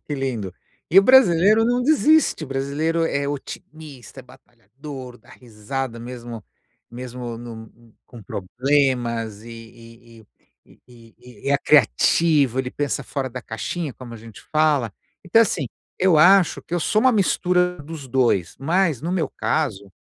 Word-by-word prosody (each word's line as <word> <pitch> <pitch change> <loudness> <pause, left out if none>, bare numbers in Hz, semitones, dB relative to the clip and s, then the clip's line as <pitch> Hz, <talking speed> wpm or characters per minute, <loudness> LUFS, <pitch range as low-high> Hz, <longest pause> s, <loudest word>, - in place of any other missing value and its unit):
Que 150 - -3
lindo. 125 -9 -3 0.4
E 180 - +7
o - - +8
brasileiro 215 -3 +5
não 245 +1 +1
desiste, 310 - +3
o - - -10
brasileiro 145 +5 -1
é 140 -2 -2
otimista, 145 -1 -9
é - - -16
batalhador, 125 +1 -12
dá - - -22
risada 120 +2 -6
mesmo 120 -2 -8 0.5
mesmo 120 -1 -7
num 115 -1 -9
hum, 115 +1 -22
com 120 -2 -13
problemas 115 0 -1
e 115 0 -14 0.4
e - - -22
e 115 -2 -18
e 125 0 -10
e - - +1
é 140 - +3
criativo, 140 - +3
ele 125 -1 -5
pensa 145 0 -3
fora 135 -2 -4
da 125 0 -8
caixinha, 140 - -5
como 120 -1 -11
a - - -8
gente 110 -1 -13
fala. 150 -7 +2 0.3
Então 205 +6 +5
assim, 175 - -2 0.3
eu 185 -3 +4
acho 185 +3 +5
que - - -17
eu - - +1
sou 215 +6 +1
uma 260 - +5
mistura 180 -3 +1
dos 150 -2 -9
2, 120 -9 +1
mas 165 0 0
no 170 - -3
meu 185 -3 -1
caso 105 -11 -2
135 Hz, 155 wpm, -22 LUFS, 115-165 Hz, 0.5 s, o